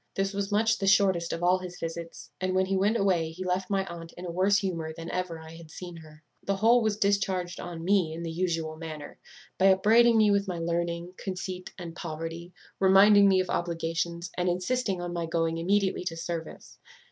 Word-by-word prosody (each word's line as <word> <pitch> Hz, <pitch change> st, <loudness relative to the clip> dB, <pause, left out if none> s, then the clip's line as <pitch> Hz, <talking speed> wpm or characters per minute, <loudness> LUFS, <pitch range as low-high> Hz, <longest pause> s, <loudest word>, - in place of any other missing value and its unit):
This 195 Hz, +1 st, -1 dB
was 200 Hz, 0 st, -3 dB
much 220 Hz, +2 st, +2 dB
the 195 Hz, -, -1 dB
shortest 190 Hz, -4 st, +3 dB
of 165 Hz, -, -4 dB
all 180 Hz, +1 st, +4 dB
his 180 Hz, -1 st, -8 dB
visits; 165 Hz, 0 st, -7 dB
and 185 Hz, 0 st, 0 dB
when 190 Hz, 0 st, +3 dB
he 195 Hz, +1 st, -1 dB
went 205 Hz, +4 st, +2 dB
away 185 Hz, -6 st, +1 dB
he 170 Hz, +3 st, -7 dB
left 185 Hz, +1 st, -1 dB
my 195 Hz, -1 st, 0 dB
aunt 170 Hz, -2 st, -9 dB
in 180 Hz, -, -9 dB
a 175 Hz, -, -4 dB
worse 190 Hz, +3 st, +3 dB
humour 170 Hz, -6 st, -2 dB
than 165 Hz, +1 st, -7 dB
ever 180 Hz, -3 st, -3 dB
I 160 Hz, 0 st, -11 dB
had 165 Hz, -1 st, -12 dB
seen 175 Hz, +1 st, -9 dB
her. 155 Hz, -1 st, -15 dB, 0.2 s
The 195 Hz, -, 0 dB
whole 230 Hz, +5 st, +4 dB
was 215 Hz, -2 st, 0 dB
discharged 190 Hz, -3 st, 0 dB
on 170 Hz, -2 st, -6 dB
me 190 Hz, -4 st, +2 dB
in 165 Hz, +1 st, -6 dB
the 165 Hz, -, -4 dB
usual 165 Hz, -2 st, -2 dB
manner, 155 Hz, -2 st, -8 dB, 0.4 s
by 190 Hz, -, +5 dB
upbraiding 225 Hz, +5 st, +5 dB
me 215 Hz, -1 st, +5 dB
with 200 Hz, 0 st, +1 dB
my 180 Hz, -2 st, -3 dB
learning, 170 Hz, +1 st, -2 dB
conceit, 185 Hz, -1 st, -5 dB
and 170 Hz, -3 st, -8 dB
poverty; 165 Hz, +1 st, -6 dB, 0.3 s
reminding 200 Hz, +1 st, +7 dB
me 190 Hz, -1 st, +4 dB
of 185 Hz, -, -4 dB
obligations, 170 Hz, 0 st, -2 dB
and 180 Hz, 0 st, +1 dB
insisting 190 Hz, +2 st, -1 dB
on 175 Hz, 0 st, -4 dB
my 170 Hz, -1 st, -2 dB
going 165 Hz, 0 st, 0 dB
immediately 195 Hz, +2 st, +1 dB
to 165 Hz, -2 st, -3 dB
service. 165 Hz, 0 st, -6 dB
180 Hz, 205 wpm, -28 LUFS, 165-195 Hz, 0.4 s, reminding